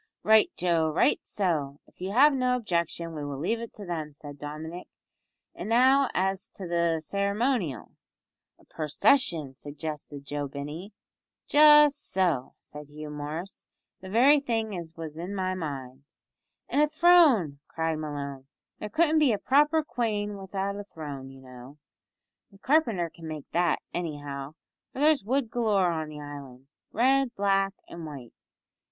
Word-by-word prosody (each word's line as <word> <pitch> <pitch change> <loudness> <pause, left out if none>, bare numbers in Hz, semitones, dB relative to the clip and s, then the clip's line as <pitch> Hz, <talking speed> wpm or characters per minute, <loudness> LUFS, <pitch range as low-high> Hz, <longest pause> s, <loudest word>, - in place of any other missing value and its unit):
"Right, 220 0 +5
Joe, 170 -3 +2
right, 155 - +2
so, 150 -8 -2
if - - -24
you 185 - -3
have 280 +7 +6
no 255 -1 +1
objection, 170 -6 -2
we 150 -2 -5
will 145 -1 -5
leave 200 +11 -1
it 230 -1 -7
to 205 - -9
them," 160 -4 -4
said 145 -1 -11
Dominick, 160 +4 -7 0.7
"and - - -6
now 260 +3 +5
as 190 +1 -1
to 190 - -7
the 170 -1 +1
ceremonial?" 200 - -1 0.7
"A - - -23
pursession," 160 - +1
suggested 145 0 -7
Joe 145 0 -3
Binney. 150 +8 -7 0.6
"Just 295 -1 +6
so," 170 -9 0
said 150 0 -12
Hugh 150 +1 -9
Morris, 150 +6 -6 0.3
"the 190 - -10
very 265 +8 +5
thing 225 -6 -2
as 170 -2 -7
was 160 -1 -7
in 185 +4 -5
my 185 -1 -1
mind." 135 -6 -6 0.6
"And 290 - +1
a 300 - +5
throne," 305 - +4
cried 160 -1 -2
Malone, 140 -3 -6 0.3
"there 210 - -5
couldn't 315 +5 +3
be 295 -5 +4
a - - 0
proper 295 +7 +3
quane 210 -6 -2
widout 195 0 -4
a - - -5
throne, 145 -8 -8
you 135 0 -14
know. 130 +2 -13 0.7
The 195 - -18
carpenter 225 - +1
can 165 -1 -10
make 155 -2 -7
that, 175 0 +1
anyhow, 145 -4 -5 0.4
for - - -13
there's 300 -3 +4
wood 245 +1 -1
galore 210 -7 +2
on 160 -2 -3
the 150 -1 -9
island 140 -3 -10 0.3
red, 260 +1 +2
black, 195 0 +1
an' 170 -1 -8
white. 135 -6 -9
175 Hz, 155 wpm, -27 LUFS, 150-225 Hz, 0.7 s, have